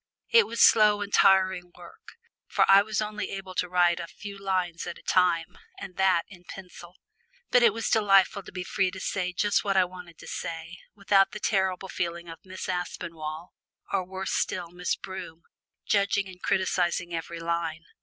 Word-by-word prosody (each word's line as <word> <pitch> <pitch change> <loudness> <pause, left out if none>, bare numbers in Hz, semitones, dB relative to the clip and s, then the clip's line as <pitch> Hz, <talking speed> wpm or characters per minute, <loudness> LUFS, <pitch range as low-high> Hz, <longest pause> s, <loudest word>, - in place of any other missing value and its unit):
It 460 0 +6
was 230 0 -2
slow 210 -2 +4
and 205 0 -5
tiring 190 -2 +4
work, 175 - -15 0.3
for - - +3
I 195 0 +8
was 215 +1 -2
only 210 0 -4
able 195 -1 -7
to 180 0 -1
write 175 -1 +3
a 170 - -5
few 200 +2 -9
lines 185 -4 -2
at 170 - -6
a - - -17
time, 175 -3 +1 0.2
and 190 -2 -9
that 190 -3 +3
in 180 -3 -15
pencil. 180 -1 -11 0.6
But 245 - +5
it 235 -2 +6
was 225 +1 -3
delightful 200 -2 +3
to - - -13
be 180 0 -5
free 190 +1 0
to 185 +1 -9
say 180 -1 -2
just 205 +3 +1
what 195 -1 0
I 185 - +5
wanted 180 -2 -12
to - - -13
say, 165 +2 -6 0.2
without 200 -1 +3
the 210 - -6
terrible 190 -2 0
feeling 170 -1 -4
of 165 - -9
Miss 185 0 -7
Aspinall, 170 -2 -5 0.4
or 195 -2 +1
worse 190 +1 -5
still 175 -2 -2
Miss 180 0 -2
Broom, 170 -3 -9 0.4
judging 200 -1 +1
and 180 -1 -13
criticising 175 -2 0
every 165 0 -5
line. 165 -1 -3
185 Hz, 185 wpm, -27 LUFS, 175-195 Hz, 0.6 s, I